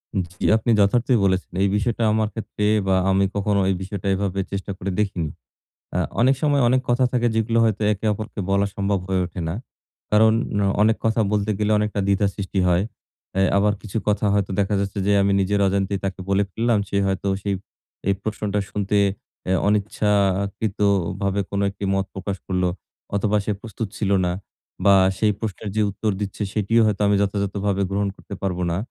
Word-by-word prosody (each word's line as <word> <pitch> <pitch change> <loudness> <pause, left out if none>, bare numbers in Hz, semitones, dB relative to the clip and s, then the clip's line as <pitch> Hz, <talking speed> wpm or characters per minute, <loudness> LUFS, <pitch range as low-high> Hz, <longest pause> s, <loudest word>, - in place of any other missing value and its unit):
উম 95 - +2 0.2
জি - - 0
আপনি 110 +2 0
যথার্থই 120 +5 +3
বলেছেন। 95 -1 0
এই 100 - +4
বিষয়টা 115 +2 0
আমার 110 0 +1
ক্ষেত্রে 105 -2 -3 0.2
বা, 95 - +3 0.2
আমি 95 +1 +3
কখনো 100 0 +1
এই 95 - +2
বিষয়টা 100 0 -5
এভাবে 100 0 -2
চেষ্টা 100 0 -4
করে 95 +1 -3
দেখিনি। 95 -6 -1 0.7
আ - - +2 0.2
অনেক 130 +3 +4
সময় 145 -2 +3
অনেক 130 +1 +3
কথা 120 +1 +3
থাকে, 120 -1 +2
যেগুলো 110 +1 +1
হয়তো 110 -1 0
একে 100 +2 -7
অপরকে 110 +1 -7
বলা 100 +1 +3
সম্ভব 100 -1 0
হয়ে 95 -1 +1
ওঠে 90 +1 -8
না। 85 - -3 0.6
কারণ, 110 +1 +6 0.5
অনেক 110 +1 +4
কথা 115 0 +2
বলতে 105 0 +1
গেলে 105 0 +1
অনেকটা 105 -1 -1
দ্বিধা 100 0 +3
সৃষ্টি 100 -1 -3
হয়। 90 +1 +3 0.6
এ - - +4 0.2
আবার 105 +1 +3
কিছু 110 0 -5
কথা 105 0 +1
হয়তো 100 -1 0
দেখা 100 +1 +1
যাচ্ছে 100 0 -3
যে, 105 - +4
আমি 100 0 +2
নিজের 100 +1 +1
অজান্তেই 100 0 0
তাকে 95 -1 -3
বলে 100 +1 +3
ফেললাম, 115 +1 +1
সে 100 - 0
হয়তো 95 +1 -1 0.2
সেই 100 - 0 0.5
এই 100 - +4
প্রশ্নটা 105 -1 -2
শুনতে 105 0 -2 0.6
এ - - +4
অনিচ্ছাকৃতভাবে 100 -1 +1
কোনো 100 0 0
একটি 100 +1 -9
মত 95 0 0
প্রকাশ 95 0 -4
করলো 90 -1 +1 0.5
অথবা, 105 +1 +2
সে - - 0
প্রস্তুত 110 -1 -5
ছিল 100 -2 0
না 90 - 0 0.5
বা, 100 -1 +7 0.2
সেই 105 -1 +3
প্রশ্নের 105 -1 -4
যে 110 - +2
উত্তর 105 +2 -1
দিচ্ছে, 100 +1 -4
সেটিও 110 +2 +2
হয়তো 105 -1 0
আমি 100 - +3
যথাযথভাবে 100 0 -1
গ্রহণ 100 +1 0
করতে 100 - -9
পারবো 90 -2 -1
না। 85 - -1
100 Hz, 185 wpm, -22 LUFS, 95-105 Hz, 0.7 s, বা